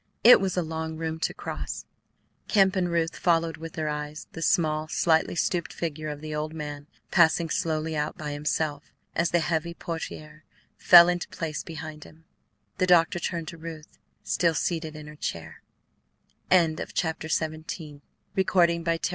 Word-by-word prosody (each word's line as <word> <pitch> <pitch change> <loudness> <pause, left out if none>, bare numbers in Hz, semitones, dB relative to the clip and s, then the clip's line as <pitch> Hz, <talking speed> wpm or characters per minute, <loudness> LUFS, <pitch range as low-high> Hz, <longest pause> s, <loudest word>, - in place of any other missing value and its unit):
It 240 -2 +9
was 190 -1 -1
a 180 - +2
long 160 0 -4
room 160 0 -3
to - - 0
cross. - - -6 0.6
Kemp 195 -2 +4
and 180 -2 +1
Ruth 165 -1 0
followed 165 -2 +1
with 165 0 -8
their 155 -1 -2
eyes 150 0 -4
the 165 - -8
small, 155 -2 +2
slightly 160 +1 +2
stooped 175 -1 0
figure 155 -2 -4
of 150 -1 -6
the 155 0 -6
old 155 +1 -3
man 145 -2 -6 0.2
passing 165 -2 +4
slowly 160 0 -1
out 150 0 -2
by 150 -1 -5
himself. 145 0 -2 0.3
As 170 0 +2
the 170 - +2
heavy 170 +1 -1
portiere 155 -2 -7 0.3
fell 175 -1 +9
into 175 -1 -1
place 155 -3 -4
behind 155 -2 -8
him, 160 +1 -17 0.5
the 185 - +2
doctor 175 -1 +4
turned 170 -2 -3
to 170 - -10
Ruth, 160 -1 -9 0.2
still 170 -2 +1
seated 160 -1 -2
in 155 -1 -9
her 150 0 -11
chair. 85 - -5 0.9
Chapter 160 -2 +1
XVIII 155 0 -1
She 155 -4 -6
was 190 +6 -4
perfectly 170 -2 +2
still. - - +2
160 Hz, 165 wpm, -26 LUFS, 155-170 Hz, 0.9 s, It